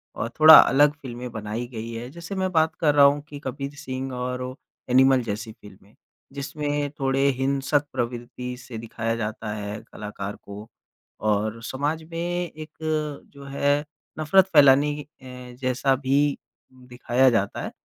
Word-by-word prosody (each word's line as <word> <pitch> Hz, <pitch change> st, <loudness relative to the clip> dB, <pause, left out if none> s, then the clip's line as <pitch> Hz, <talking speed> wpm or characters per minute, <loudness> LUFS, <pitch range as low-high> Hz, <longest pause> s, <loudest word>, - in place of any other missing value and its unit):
और 115 Hz, -, -3 dB
थोड़ा 155 Hz, 0 st, +11 dB
अलग 145 Hz, +2 st, +5 dB
फ़िल्मे 125 Hz, -1 st, -7 dB
बनाई 110 Hz, +1 st, -5 dB
गई 115 Hz, -1 st, -7 dB
है 115 Hz, +2 st, -6 dB
जैसे 170 Hz, +4 st, -8 dB
मैं 190 Hz, -1 st, -1 dB
बात 160 Hz, -2 st, +2 dB
कर 150 Hz, -3 st, +3 dB
रहा 140 Hz, -1 st, +8 dB
हूँ 145 Hz, +1 st, +3 dB
कि 145 Hz, -, -8 dB
कबीर 140 Hz, +2 st, -5 dB
सिंह 135 Hz, -3 st, -5 dB
और 125 Hz, 0 st, -3 dB, 0.5 s
एनिमल 130 Hz, +1 st, +5 dB
जैसी 110 Hz, 0 st, -5 dB
फ़िल्में 100 Hz, -1 st, -17 dB, 0.4 s
जिसमें 145 Hz, +1 st, -3 dB
थोड़े 135 Hz, 0 st, +1 dB
हिंसक 140 Hz, +2 st, 0 dB
प्रवृत्ति 125 Hz, 0 st, -4 dB
से 125 Hz, -2 st, -9 dB
दिखाया 115 Hz, 0 st, -3 dB
जाता 110 Hz, -1 st, -4 dB
है 105 Hz, 0 st, -5 dB
कलाकार 105 Hz, -1 st, -6 dB
को 100 Hz, +2 st, -10 dB, 0.6 s
और 105 Hz, +2 st, -1 dB
समाज 145 Hz, +6 st, -2 dB
में 165 Hz, -, -5 dB
एक 170 Hz, -2 st, -4 dB, 0.6 s
जो 140 Hz, 0 st, -12 dB
है 145 Hz, +1 st, +1 dB, 0.4 s
नफरत 185 Hz, +5 st, +4 dB
फ़ैलाने 145 Hz, 0 st, +6 dB
क, -, -, -28 dB
ए 125 Hz, -1 st, -10 dB
जैसा 130 Hz, +1 st, +1 dB
भी 140 Hz, +2 st, +1 dB, 0.4 s
दिखाया 125 Hz, 0 st, +1 dB
जाता 100 Hz, -4 st, -1 dB
है -, -, -5 dB
130 Hz, 150 wpm, -24 LUFS, 115-145 Hz, 0.6 s, थोड़ा